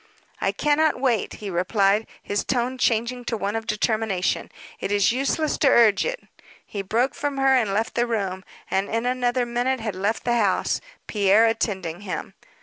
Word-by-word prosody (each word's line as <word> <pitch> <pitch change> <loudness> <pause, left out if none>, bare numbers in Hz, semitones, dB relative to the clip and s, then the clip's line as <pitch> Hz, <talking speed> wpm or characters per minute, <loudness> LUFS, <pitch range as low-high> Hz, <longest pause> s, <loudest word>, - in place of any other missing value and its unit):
"I - - +1
cannot 300 -1 +2
wait," 245 -6 0
he 205 -2 -6
replied, 195 +4 +2 0.2
his 205 - -1
tone 255 0 -1
changing 240 +1 0
to 230 - -2
one 205 +1 -2
of 225 0 -4
determination. 210 -3 0 0.3
"It 195 - -3
is 205 +1 +3
useless 275 +5 0
to 285 - +4
urge 225 -5 +5
it." - - -3 0.4
He 200 - -5
broke 230 +7 0
from 285 -1 -3
her 270 0 +4
and 225 -6 +2
left 220 +3 -1
the 240 0 +1
room, 195 -5 -2 0.3
and 195 +1 0
in 230 +1 -1
another 250 0 +1
minute 245 +2 -1
had 220 -2 -3
left 205 +4 -1
the 240 -1 +1
house, 200 -5 +1 0.2
Pierre 205 +1 +4
attending 190 -6 -1
him. 195 -3 -5
225 Hz, 175 wpm, -24 LUFS, 200-250 Hz, 0.4 s, urge